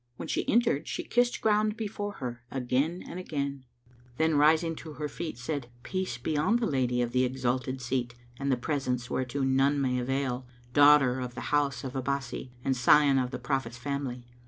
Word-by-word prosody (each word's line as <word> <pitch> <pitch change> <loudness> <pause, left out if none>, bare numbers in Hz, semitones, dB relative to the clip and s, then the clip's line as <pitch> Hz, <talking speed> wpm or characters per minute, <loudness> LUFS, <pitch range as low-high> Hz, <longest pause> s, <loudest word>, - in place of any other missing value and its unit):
When - - -7
she - - -1
entered 230 - +2
she - - -3
kissed 245 0 +1
ground 215 0 +2
before 205 -2 -4
her 125 -6 -6
again 135 +7 -1
and 180 - -6
again, 140 -6 -3 0.5
then 160 0 +2
rising 160 +3 +4
to 160 -2 -8
her 150 0 -4
feet, 155 -1 -5
said, 130 0 -3 0.2
"Peace 185 -10 -3
be 155 +6 -2
on 155 +10 +2
the 240 -1 +1
Lady 125 - +1
of 120 - -3
the 125 +1 +3
exalted 130 0 -1
seat 120 -1 -2 0.2
and 140 0 0
the 130 - +2
presence 125 -2 -2
whereto 130 +2 -1
none 135 +2 +3
may 125 -2 +1
avail, 130 0 -2 0.3
daughter 145 -3 +6
of 125 -1 -5
the 130 - -5
house 145 -2 +1
Abbásí 130 -1 -3 0.2
and 135 - +2
scion 135 +2 +5
of 125 -1 0
the - - -4
Prophet's 135 -4 -2
family! 130 -2 -4
135 Hz, 180 wpm, -29 LUFS, 125-150 Hz, 0.5 s, daughter